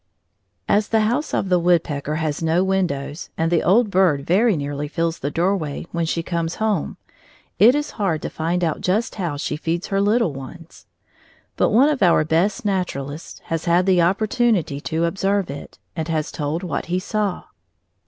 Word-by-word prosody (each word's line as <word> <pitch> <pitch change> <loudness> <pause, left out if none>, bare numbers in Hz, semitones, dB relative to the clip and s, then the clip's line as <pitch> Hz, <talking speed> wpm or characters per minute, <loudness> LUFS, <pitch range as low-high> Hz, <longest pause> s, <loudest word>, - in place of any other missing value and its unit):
] - - -51 0.3
As 210 0 +2
the 220 -1 +2
house 245 +8 0
of 195 - -1
the 180 -1 +3
woodpecker 160 -4 +1
has 155 -1 -2
no 165 +3 +2
windows 170 -6 -2
and 165 +1 0
the 170 - +3
old 210 +3 +3
bird 175 -7 +2
very 200 +3 +3
nearly 145 0 -3
fills 165 +2 -2
the 140 - -2
doorway 170 -2 -1
when 170 -1 -1
she 165 +1 -1
comes 170 -1 -2
home, 215 -7 -1 0.6
it 230 +7 +7
is 295 0 -2
hard 165 -6 0
to - - -3
find 170 +3 -1
out 160 -3 -1
just 205 +6 0
how 175 -7 -3
she 150 - -3
feeds 170 +4 -3
her 195 0 +1
little 205 -4 +2
ones. 155 +5 -11 0.7
But - - +2
one 255 +7 +5
of 295 -6 -1
our 170 -4 +4
best 185 +10 +1
naturalists 165 -7 -3
has 165 -1 -1
had 175 +1 +3
the 185 -2 +4
opportunity 195 - +1
to 165 +1 -1
observe 195 0 0
it, 140 - -9 0.2
and 160 -2 -3
has 160 -2 -2
told 155 +4 -3
what 165 -6 -3
he 175 +1 0
saw. 200 0 -2
175 Hz, 185 wpm, -21 LUFS, 160-195 Hz, 0.7 s, it